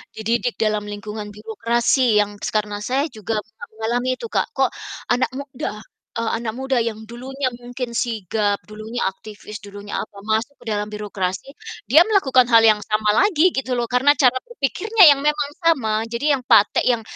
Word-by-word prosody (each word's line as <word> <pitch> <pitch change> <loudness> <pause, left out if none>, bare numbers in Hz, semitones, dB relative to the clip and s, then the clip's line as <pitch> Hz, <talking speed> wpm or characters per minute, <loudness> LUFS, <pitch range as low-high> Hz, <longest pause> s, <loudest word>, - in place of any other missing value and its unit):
dididik 235 +2 -1
dalam 215 -1 0
lingkungan 210 +1 -6
birokrasi 230 +4 0 0.2
yang 205 0 -10
s - - -3
karena 210 -1 -1
saya 260 +6 0
juga 220 -1 -4
a 220 +1 -12
mengalami 240 +3 -1
itu 465 - -7
Kak. - - +1
Kok - - +2 0.4
anak 250 - +2
muda, 275 -2 -5 0.5
eee, 230 -1 -1
anak 225 -2 -4
muda 265 -1 0
yang 225 -2 -2
dulunya, 255 +4 -5
mungkin 245 0 -5
sigap, 210 -2 -1
dulunya 215 +3 -6
aktivis, 210 +1 -10
dulunya 205 0 -9
apa, 205 - -10
masuk 235 +6 0
dalam 210 -2 -2
birokrasi 210 +2 -4 0.4
dia 305 +7 +8
melakukan 265 - +4
hal 230 -1 +6
yang 215 -1 +5
sama 215 0 +1
lagi 365 -3 +4
gitu 265 -1 -2
loh, 240 - 0
karena 265 +3 +5
cara 255 -2 +4
berpikirnya 435 - +2
yang 280 - +2
memang 295 -1 +1
sama. 265 -10 +2 0.2
Jadi 235 +5 -2
yang 260 -2 -2
patek 210 -3 +5
yang 230 -2 -1
230 Hz, 170 wpm, -21 LUFS, 215-265 Hz, 0.5 s, dia